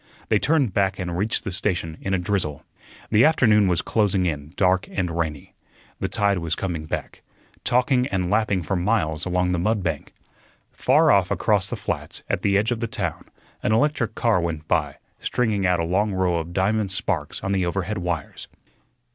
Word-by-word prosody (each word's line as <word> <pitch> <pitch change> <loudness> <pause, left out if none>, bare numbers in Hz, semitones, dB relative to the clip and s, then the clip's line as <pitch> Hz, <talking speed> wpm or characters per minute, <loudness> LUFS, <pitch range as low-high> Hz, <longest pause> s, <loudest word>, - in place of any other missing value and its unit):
They - - +4
turned 140 - +2
back 95 -1 +1
and 90 -2 -4
reached 105 +6 -1
the 95 - -4
station 90 -4 -1
in 95 - -3
a 95 - +2
drizzle. 90 -5 -2 0.5
The 110 +2 +5
afternoon 110 -9 +4
was 90 -2 +1
closing 100 -4 +1
in 75 -3 -3
dark 95 0 +2
and 90 -3 -2
rainy. 80 -4 -3 0.5
The - - -1
tide 100 -3 +1
was 80 -1 -1
coming 85 -5 -3
back, - - -5 0.4
talking 125 +1 +2
and 90 -2 -1
lapping 105 -5 +1
for 90 +5 -1
miles 90 -4 0
along 90 0 +1
the 90 - 0
mud 105 +2 0
bank. 80 -4 -4 0.6
Far - - +4
off - - +3
across - - +1
the - - -3
flats, - - -5
at - - 0
the 100 0 +3
edge 110 +4 +1
of 120 - -1
the 115 - -2
town, 100 - -3 0.4
an 110 - +1
electric 120 0 +1
car 115 -6 +2
went 80 -2 -4
by, 75 -4 0 0.2
stringing 105 -6 0
out 90 -1 +2
a - - 0
long 100 +5 +1
row 90 -2 +1
of 85 +1 -4
diamond 100 +3 +1
sparks 95 - -2
on 95 - -1
the 95 -2 +1
overhead 95 +3 -2
wires. 85 -5 -4
95 Hz, 190 wpm, -23 LUFS, 85-105 Hz, 0.6 s, The